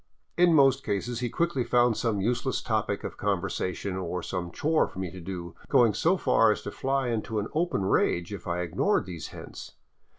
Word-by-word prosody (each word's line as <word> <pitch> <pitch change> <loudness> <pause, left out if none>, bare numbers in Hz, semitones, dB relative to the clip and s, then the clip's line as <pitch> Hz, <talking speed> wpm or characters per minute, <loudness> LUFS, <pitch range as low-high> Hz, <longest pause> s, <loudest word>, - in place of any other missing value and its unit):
In 175 -2 +5
most 135 -2 +5
cases 115 +4 -2
he 120 -1 -1
quickly 170 -2 0
found 120 -1 +3
some 110 -4 0
useless 120 +4 -1
topic - - -1
of - - -6
conversation, 95 +1 -2
or 90 -1 -3
some 90 -2 -3
chore 155 - +1
for - - -14
me 95 -2 -3
to 95 - -9
do, 85 -1 -6 0.2
going 115 -4 +5
so 175 - +2
far 115 -9 +4
as - - -3
to 105 - -5
fly 135 +1 -1
into 110 -1 -2
an 105 0 -2
open 165 - 0
rage 85 0 +1
if 95 - -8
I 90 0 -1
ignored 85 0 +1
these 90 -3 -6
hints. - - -10
110 Hz, 195 wpm, -27 LUFS, 90-130 Hz, 0.2 s, In